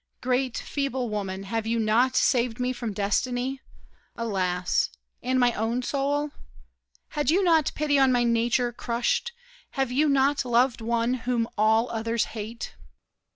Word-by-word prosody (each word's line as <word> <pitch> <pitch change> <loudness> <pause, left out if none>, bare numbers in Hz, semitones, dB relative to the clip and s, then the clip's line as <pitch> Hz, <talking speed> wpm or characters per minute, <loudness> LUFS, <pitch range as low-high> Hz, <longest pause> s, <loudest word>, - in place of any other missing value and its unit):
Great, 255 0 0
feeble 265 -4 -2
woman, 195 -2 -3
have 220 +3 -3
you 230 +1 +1
not 230 +4 +2
saved 245 -2 +2
me 250 +1 0
From 240 -3 -4
destiny, 245 +6 -1 0.5
alas! 185 -5 0 0.3
and 255 +1 +1
my 245 -1 +4
own 230 +4 -1
soul? 285 +2 -1 0.8
Had 295 -1 -1
you 370 +5 +3
not 325 -4 +3
pity 290 -2 +2
on 265 -1 +5
my 245 -1 +3
nature, 240 +1 +1
crushed? 240 - -1 0.5
Have 270 -2 0
you 295 +4 +2
not 275 +1 +3
loved 245 0 +2
one 235 +1 0
whom 240 -2 -1
all 220 +2 +3
others 230 0 0
hate? 225 +1 -6
245 Hz, 145 wpm, -26 LUFS, 225-265 Hz, 0.8 s, on